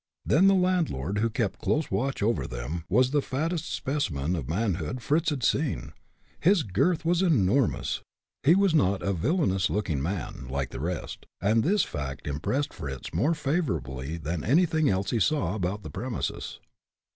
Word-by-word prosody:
Then 185 +6 +5
the 195 - +6
landlord, 165 - +1
who 115 +2 +2
kept 110 -3 -1
a - - -24
close 150 0 0
watch 120 +4 -1
over 115 +2 +1
them, 65 +8 -5
was 125 +6 +3
the 145 -1 +3
fattest 155 +6 -2
specimen 90 - -1
of 70 -6 -5
manhood 95 +3 -1
Fritz 155 +4 +2
had 140 -5 -3
seen; 140 +5 0 0.5
his 185 -1 +4
girth 140 - +1
was 170 +1 +3
something 175 -6 +4
enormous. 110 +6 +1 0.4
He 160 +5 +5
was 195 -3 +3
not 100 - +2
a 100 - +1
villainous 95 - +1
looking 90 -9 -1
man, 80 -5 -4
like 70 -1 -2
the - - -6
rest, 85 +5 -4
and 110 +3 +2
this 200 +3 +3
fact 70 -1 -5
impressed 105 - -1
Fritz 65 -2 -6
more 165 +4 +2
favorably 80 - -2
than 80 0 -3
anything 155 - +3
else 95 0 0
he 115 - +1
saw 110 - +1
about 100 0 -2
the - - -7
premises. 125 -2 -4
110 Hz, 170 wpm, -27 LUFS, -, 0.5 s, the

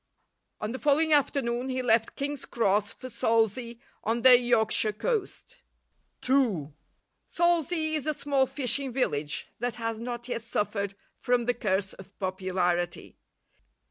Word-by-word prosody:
On 215 - -3
the 260 - -5
following 305 +2 +3
afternoon 260 -3 +1
he 255 0 -2
left 225 -2 +2
King's 285 0 -3
Cross 205 -3 +1
for 255 - -9
Salsay 230 0 0 0.3
on 230 +2 -1
the 260 -1 +9
Yorkshire 225 -3 +2
coast. 425 - -3 0.7
II 215 - +2 0.5
Salsay 335 -2 +1
is 305 -1 -2
a 305 - +2
small 275 -2 +1
fishing 270 0 0
village 150 - -1
that 245 -1 -2
has 230 -1 -3
not 240 0 -5
yet 240 -2 -3
suffered 205 -3 -2 0.2
from 245 -1 +1
the 245 - +2
curse 195 -4 -1
of 195 +1 -14
popularity. 185 -2 -1
240 Hz, 135 wpm, -28 LUFS, 210-270 Hz, 0.7 s, the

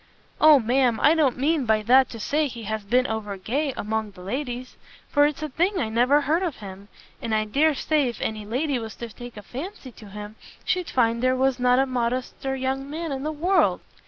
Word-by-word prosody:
"O, 310 -1 +8
ma'am, 245 0 +2
I 300 - +5
don't 300 -6 +2
mean 285 -1 +1
by 215 -1 +2
that 255 +4 +5
to 230 - -8
say 295 +7 0
he 235 -3 -8
has 215 0 -3
been 250 +5 +2
over 215 -3 -4
gay 275 +9 -1
among 220 0 -2
the 185 -2 -14
ladies, 250 +3 -5 0.3
for 290 0 +4
it's 300 0 -5
a - - -1
thing 360 +8 0
I 225 - -1
never 250 +6 +3
heard 315 +5 +1
of 340 -7 -2
him; 200 -1 -10 0.3
and 225 -1 -1
I 215 0 +1
dare 290 +8 +2
say 300 -1 +1
if 235 - -8
any 215 -1 -3
lady 255 +5 -1
was 225 -1 -7
to 235 - -7
take 245 -2 -10
a 210 - -8
fancy 280 - -8
to 215 -2 -14
him, 210 +2 -9 0.3
she'd 365 -2 -1
find 235 -2 +1
there 255 0 +2
was 265 0 +1
not 250 0 +3
a 270 - +3
modester 255 +1 -2
young 265 +1 -3
man 320 +1 -4
in 265 -1 -3
the 305 +2 -2
world. 345 +6 +2
255 Hz, 220 wpm, -24 LUFS, 220-290 Hz, 0.3 s, O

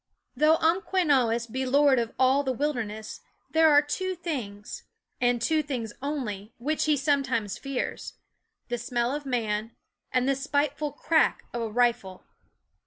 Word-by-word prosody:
Though 305 +4 +4
Umquenawis 315 - +2
be 260 +3 -3
lord 275 0 +4
of 230 -1 -3
the 265 +1 +3
wil 295 +1 +1
derness, 220 -3 -6 0.3
there 320 0 +5
are 290 0 +6
two 370 +5 -3
things, 240 - -5 0.4
and 245 -1 +2
two 310 +7 +2
things 245 -7 -4
only, 235 -8 -4
which 300 +6 -1
he 305 -1 +3
sometimes 260 -7 0
fears: 275 -2 -4 0.5
the 240 0 -3
smell 240 +2 -1
of 290 -1 -5
man, 225 -3 -2 0.4
and 255 0 +1
the 275 - +2
spiteful 290 +1 -1
crack 315 +2 +1
of 240 - -2
a 225 - -2
rifle. 225 -5 0
265 Hz, 145 wpm, -27 LUFS, 235-295 Hz, 0.5 s, are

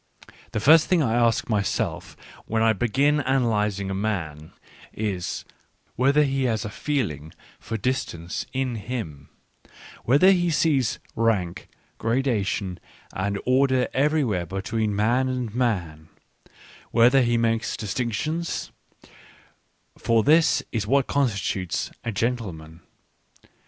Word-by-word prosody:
The - - -1
first 155 +7 +6
thing 175 -4 +3
I 115 -4 0
ask 115 -1 +2
my 105 -3 +1
self 100 - -3 0.3
when 110 0 +1
I 110 0 +4
begin 135 +7 +1
analysing 105 -7 0
a - - -2
man, 85 -7 -3 0.4
is, 100 -5 -3 0.5
whether 140 +4 +3
he 135 -2 0
has 110 -2 -1
a 105 - -5
feeling 100 - -3 0.3
for 115 - -4
distance 100 -8 -3
in 130 -2 -1
him; 105 - -6 0.7
whether 145 +10 +5
he 175 -2 +2
sees 145 -7 +1 0.2
rank, 110 -7 0 0.3
gradation, 110 -6 -1 0.3
and 100 +1 -2
order 130 0 +3
everywhere 130 - +1
between 105 +3 -2
man 120 +5 +2
and 125 -4 -3
man; 90 -11 -2 0.8
whether 120 +4 +5
he 120 -1 +2
makes 115 0 0
distinctions; 125 - -3 1.3
for 115 -1 +2
this 160 +4 +4
is 110 -3 -2
what 135 +2 +3
constitutes 100 - -1
a 115 - -2
gentleman. 100 -8 -3
115 Hz, 115 wpm, -24 LUFS, 100-130 Hz, 1.3 s, first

